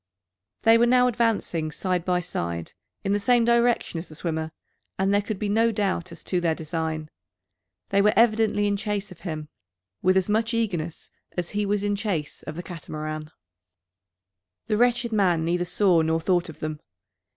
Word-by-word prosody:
They 225 +1 +6
were 240 - +5
now 250 0 +5
advancing 220 -9 0
side 180 +2 -1
by 180 -1 +1
side, 85 - -4 0.3
in 195 - +1
the 205 - +2
same 240 +3 +3
direction 235 -7 +2
as 165 - -7
the 155 - -11
swimmer, 160 -1 -3 0.5
and 195 +1 +2
there 205 - +4
could 210 0 -4
be 210 - -2
no 225 +3 +3
doubt 200 -5 -1
as - - -10
to 180 -2 0
their 165 -2 +1
design. 160 -1 -3 0.8
They 200 0 +3
were 210 +1 +4
evidently 215 -2 +3
in 205 0 +1
chase 205 -1 -3
of 180 - -12
him, 155 -4 -5 0.5
with 185 +1 +4
as 190 - +2
much 225 +2 +1
eagerness 175 -8 -2 0.3
as 175 -1 -2
he 205 0 -1
was 205 0 0
in 205 0 +1
chase 195 -8 -3
of 155 - -5
the 175 - -5
Catamaran. 155 -3 -6 1.4
The 210 - 0
wretched 240 0 +2
man 180 -6 +2
neither 175 +1 0
saw 180 -2 +3
nor 160 0 +1
thought 175 +1 +1
of 160 - -11
them. 155 -1 -3
190 Hz, 180 wpm, -25 LUFS, 165-215 Hz, 1.4 s, They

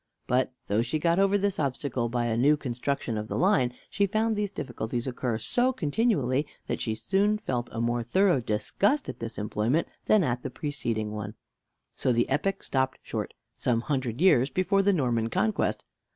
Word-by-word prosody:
But, 130 +1 +1
though 105 +3 +1
she 120 +6 -1
got 170 +3 +2
over 195 +1 +4
this 200 -1 -1
obstacle 130 -4 -1
by 120 0 0
a 115 -1 0
new 145 +6 +4
construction 125 -3 -2
of 105 - -5
the - - -3
line, 180 -10 +3 0.2
she 200 -1 +1
found 220 +3 +1
these 205 -1 -1
difficulties 120 - -4
occur 125 -3 -2
so 245 - +1
continually 150 - +1 0.2
that - - -3
she 110 -2 -1
soon 200 - +1
felt 125 - -3
a 115 - -5
more 120 +1 0
thorough 180 - +3
disgust 195 - 0
at - - -6
this 115 0 -6
employment 110 +9 0 0.2
than 215 -3 +5
at 125 -4 -1
the 135 - -4
preceding 120 -7 -3
one. 105 0 -5 0.6
So 130 - +1
the 120 0 +2
epic 185 +8 0
stopped 130 -1 0
short, - - -4 0.2
some 115 -2 0
hundred 130 -2 -2
years 145 -8 +5
before 185 +6 +2
the 200 +1 +3
Norman 120 - +1
conquest. 110 -1 0
130 Hz, 180 wpm, -28 LUFS, 120-190 Hz, 0.6 s, than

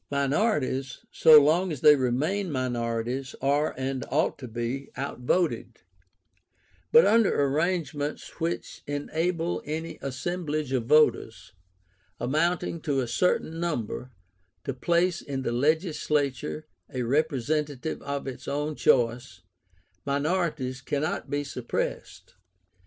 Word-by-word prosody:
Minorities, 140 - 0
so 155 -1 +8
long 165 +5 +2
as 150 - -5
they 150 - +8
remain 150 +9 0
minorities, 125 0 -2
are, 145 +3 +1
and 130 0 -2
ought 145 +2 +1
to 130 - -7
be, 120 +4 -4
outvoted; 140 +6 -1 1.1
but 475 +1 +8
under 230 -8 +4
arrangements 150 0 -1
which 165 +1 -3
enable 165 +4 -1
any 160 +2 -5
assemblage 150 +1 -3
of 125 -4 -1
voters, 110 - +2 0.7
amounting 160 +5 0
to 140 -3 0
a 125 - -1
certain 165 +2 0
number, 130 -7 -3 0.5
to 135 - -3
place 170 +6 +1
in 135 -2 -4
the 120 - -1
legislature 145 - 0 0.3
a 130 -1 -2
representative 150 +2 -1
of 140 0 -4
its 135 -2 -7
own 150 +2 -1
choice, 120 -8 +1 0.6
minorities 145 -3 -1
cannot 145 +4 -2
be 145 0 -1
suppressed. 125 -4 -4
145 Hz, 110 wpm, -27 LUFS, 130-160 Hz, 1.1 s, so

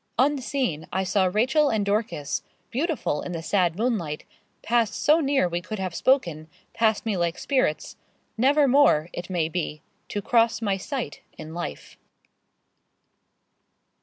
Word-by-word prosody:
Unseen 260 - 0
I 190 +4 0
saw 190 +1 +2
Rachel 265 +8 +3
and 215 -4 0
Dorcas, 200 - -1 0.3
beautiful 275 - -1
in 180 - -5
the 165 -1 -5
sad 175 -2 +1
moonlight, 205 -10 -1 0.4
passed 230 -2 +1
so 305 +2 +4
near 275 - +2
we 175 0 -2
could 215 +5 -6
have 185 -3 -3
spoken 170 - +1 0.3
passed 220 -1 +1
me 220 -3 0
like 170 -1 0
spirits 255 - -1 0.4
never 280 +5 +4
more, 250 - +4
it 175 +1 -6
may 175 -4 0
be, 160 -3 -4 0.3
to 205 - -2
cross 230 -1 +2
my 205 -4 0
sight 255 +7 -5 0.2
in 155 +1 -8
life. 165 - -7
210 Hz, 140 wpm, -25 LUFS, 170-255 Hz, 0.4 s, so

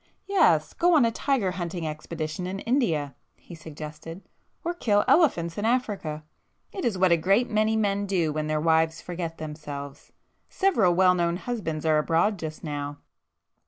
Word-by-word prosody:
"Yes,—go 355 -3 +3
on 285 -6 +5
a 230 - +1
tiger 235 -6 0
hunting 175 -2 -4
expedition 155 +2 -5
in 190 +1 -4
India,"—he 170 - -2
suggested—"Or 160 - -9
kill 210 -11 +1
elephants 175 - +3
in - - -3
Africa. 205 -11 -1 0.5
It 380 - -6
is 220 -5 0
what 185 -1 +3
a 170 - +5
great 195 +9 +2
many 215 +1 +2
men 205 -2 0
do 170 -6 0
when 155 0 -2
their 155 0 0
wives 160 0 +2
forget 170 -2 -5
themselves. 145 -2 -8 0.4
Several 230 - +2
well 185 0 +5
known 170 -1 0
husbands 175 -9 -4
are 155 -1 +4
abroad 170 +6 +1
just 155 -1 -6
now!" 145 -2 -4
175 Hz, 150 wpm, -26 LUFS, 155-215 Hz, 0.5 s, on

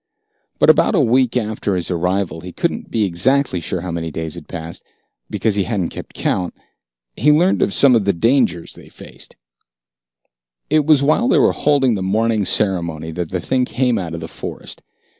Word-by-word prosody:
But - - +6
about - - +2
a - - +3
week 125 +1 +2
after 110 -3 -2
his 90 0 -2
arrival 90 0 -1
he 90 +1 -8
couldn't - - -3
be 115 - -1
sure - - +3
exactly 120 +5 +1
how 85 +2 -4
many 80 -1 -4
days 80 0 -5
had 85 -3 -9
passed, 85 -2 -7 0.5
because 110 - -1
he 100 -2 0
hadn't 100 -7 -2
kept - - -10
count 90 -1 -2 0.6
he 150 +6 +3
learned 175 +5 +3
of 200 - +2
some 140 -9 +5
of 110 -4 +1
the 100 - +3
dangers 95 -3 +1
they - - -14
faced. - - -12 1.4
It 155 -1 +2
was 150 -3 +5
while 155 - +2
they - - +3
were - - +4
holding 140 -4 +2
the 100 - -3
morning 110 +2 0
ceremony 85 -7 -1
that 85 0 -4
the 90 - -2
thing 130 +8 0
came 125 -2 0
out 85 -3 -5
of 80 - -7
the 80 - -6
forest. - - -8
100 Hz, 190 wpm, -18 LUFS, 85-125 Hz, 1.4 s, But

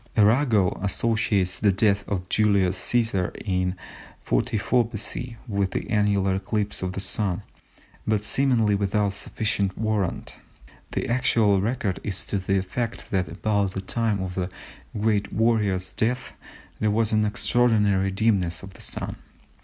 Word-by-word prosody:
Arago 110 -2 +3
associates 100 -2 +1
the 100 -1 +4
death 100 +1 +2
of 90 -3 -3
Julius 100 -3 +2
Cæsar 110 -4 0
in 90 -2 0 0.5
44 110 - +1
B.C. 115 +2 -5
with 100 -3 -1
an - - -2
annular 100 -2 +2
eclipse 105 +1 -2
of 95 0 -2
the 95 - -4
Sun, 100 -1 -1 0.6
but 105 -1 +1
seemingly 120 -4 +2
without 100 0 +1
sufficient 100 -2 -1
warrant. 110 -4 -2 0.6
The - - -1
actual 110 -5 +3
record 105 -3 -1
is 100 -2 -4
to 100 - -1
the 95 +1 0
effect 100 +5 -3
that 95 -3 +1
about 100 +3 0
the 95 - -2
time 105 -1 0
of 90 -1 -4
the 90 0 -2 0.5
great 105 -2 +1
warrior's 105 -5 +1
death 125 +3 -1 0.5
there 110 - +2
was 110 +1 +1
an 110 -1 +3
extraordinary 105 -3 +2
dimness 95 -5 +1
of 95 0 -10
the - - -13
Sun. - - -5
105 Hz, 140 wpm, -25 LUFS, 95-110 Hz, 0.6 s, the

